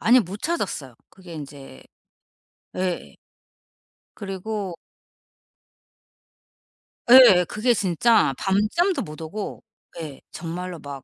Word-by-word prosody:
아니 250 +3 +5
못 200 0 -7
찾았어요. 155 - -3 0.2
그게 185 -3 -13
인제 140 - -10 0.9
예. 185 -1 -3 1.1
그리고 195 -1 -5 2.3
예예. 235 -8 +8
그게 235 +7 +1
진짜 205 -3 +2
밤잠도 215 - +1
못 150 +1 -8
오고 195 +6 -6 0.4
예 150 -4 -7
정말로 175 +1 -6
막 140 -2 -9
185 Hz, 175 characters per minute, -23 LUFS, 160-215 Hz, 2.3 s, 예예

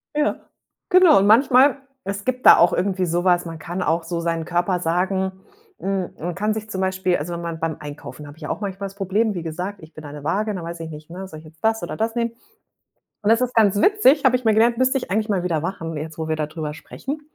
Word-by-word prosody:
Ja, 300 0 +1 0.5
genau 365 - +7
und 200 - +2
manchmal 260 +4 +5 0.3
es 200 +1 -5
gibt 255 0 -2
da - - +10
auch 170 - +5
irgendwie 185 0 0
so 175 +1 0
was 175 -1 +3
man 165 -1 -7
kann 175 +3 -4
auch 165 +2 +1
so 170 0 -3
seinen 165 -1 -2
Körper 175 +1 0
sagen 190 +3 0 0.5
hm, 195 -2 -2
man 175 +1 -4
kann 210 +3 0
sich 215 0 -6
zum 190 -2 -3
Beispiel 190 -1 +1
also, 170 +4 -5
wenn 170 - -5
man 165 -1 -5
beim 160 -1 -2
Einkaufen 145 -1 -9
habe 145 +2 -12
ich 150 - -7
auch - - -3
manchmal 200 -1 -4
das 195 - -17
Problem, 205 +3 0
wie 175 -3 -5
gesagt, 180 +5 -4
ich 160 +1 -14
bin 155 - -11
an 145 0 -9
'ner 145 - -9
Waage 210 +6 0
und 195 - -4
da 170 - -6
weiß 170 0 -6
ich 160 - -6
nicht, 155 +1 -10
ne, 185 +3 -7
soll 155 -3 -10
ich 160 - -16
jetzt 160 +3 -18
das 225 0 +1
oder - - -4
das 225 +2 -2
nehmen? 235 -1 0 0.9
Und 210 - +1
das 230 - +5
ist 250 0 -1
ganz 205 -2 +4
witzig 315 -9 +4
habe 255 -1 +5
ich 250 - -2
mal 220 - +4
gelernt, 230 +2 +3
müsste 260 +1 +3
ich 255 - -5
eigentlich 215 +2 0
mal 185 -3 0
wieder 165 -4 0
machen, 165 -3 -4
jetzt 155 +2 -6
wo 160 0 -3
wir 160 - 0
da 155 -1 -1
drüber 150 -1 -5
sprechen, 280 - -7
185 Hz, 265 wpm, -22 LUFS, 165-220 Hz, 0.9 s, da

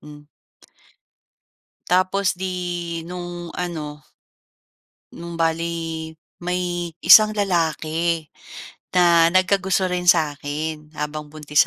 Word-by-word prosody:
ano 150 0 -14 1.6
Tapos 185 +2 +2
'di 175 -2 -4
nung 175 -1 -7
ano 150 -4 -5 1.1
nung 170 0 -8
bale, 165 -1 -2 0.2
may 175 -1 -2
isang 215 0 +8
lalaki 165 -3 0 0.7
na 170 -2 +5
nagkagusto 185 0 +2
rin 180 0 -2
sa'kin, 155 -1 0
habang 150 0 -4
buntis 150 0 +1
170 Hz, 80 wpm, -22 LUFS, 155-180 Hz, 1.6 s, isang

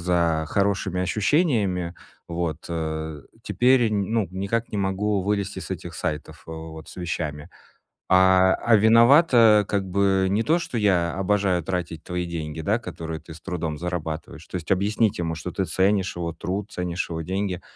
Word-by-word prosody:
за 85 -2 +1
хорошими 100 -2 0
ощущениями 100 - +1 0.3
вот, 85 -2 -3
э, 80 -2 -4 0.2
теперь 125 -1 +3
н 105 - +1
ну, 110 -7 +1
никак 100 +5 -2
не 105 - -1
могу 100 +1 0
вылезти 100 -1 -2
с 90 - -9
этих 85 -2 -6
сайтов 80 -2 -4
вот 80 0 -8
с - - -12
вещами. 80 -3 -4 0.6
А, 95 0 +5
а 115 -2 +3
виновато, 115 0 +6
как 100 -1 0
бы, 95 0 +2
не 110 +3 +1
то, 165 +3 +2
что 120 - -4
я 90 -5 +2
обожаю 95 -3 +1
тратить 85 -3 -4
твои 90 0 -3
деньги, 80 -2 -5
да, 105 +8 +1
которые 80 -7 -6
ты 80 0 -12
с 80 - -13
трудом 80 -5 -4
зарабатываешь".- 80 -2 -5
То - - -18
есть 80 - -7
объяснить 100 +2 +1
ему, 80 -1 -2
что 85 +2 -6
ты 95 +3 -2
ценишь 95 0 +1
его 85 -1 -3
труд, 95 +5 -4
ценишь 90 -2 -3
его 80 0 -3
деньги.- 95 +1 -2
95 Hz, 165 wpm, -24 LUFS, 85-100 Hz, 0.6 s, виновато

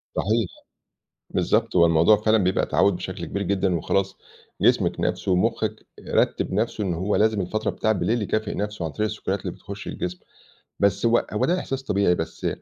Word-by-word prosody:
صحيح، 110 0 +1 0.8
بالضبط - - +1
هو 85 -1 +7
الموضوع 85 +6 +5
فعلًا 110 +1 +2
بيبقى 95 +1 +1
تعوّد 100 -2 +2
بشكل - - -6
كبير 100 - -3
جدًا، 95 -1 0
وخلاص 95 +4 -1 0.5
جسمِك - - +3
نَفْسه 95 - 0
ومخِّك 110 +3 0 0.2
رتّب - - +1
نفسه 105 +1 -1
إن 90 -3 -1
هو 95 +5 0
لازم 110 -1 +2
الفترة 110 +4 -1
بتاعة 110 - 0
بالليل 110 +3 0
يكافئ 110 +1 -1
نفسه 105 -3 -3
عن 80 - -2
طريق 105 +9 -1
السكريات 100 -2 -3
اللي - - -5
بتخُشّ 100 0 -9
الجسم، 90 0 -4 0.6
بس 100 +2 +2
هو 115 +1 +3
هو 105 - +1
ده 180 +2 +1
إحساس 135 -5 -4
طبيعي، 100 -7 +2
بس 80 -1 -4
100 Hz, 175 wpm, -24 LUFS, 95-110 Hz, 0.8 s, هو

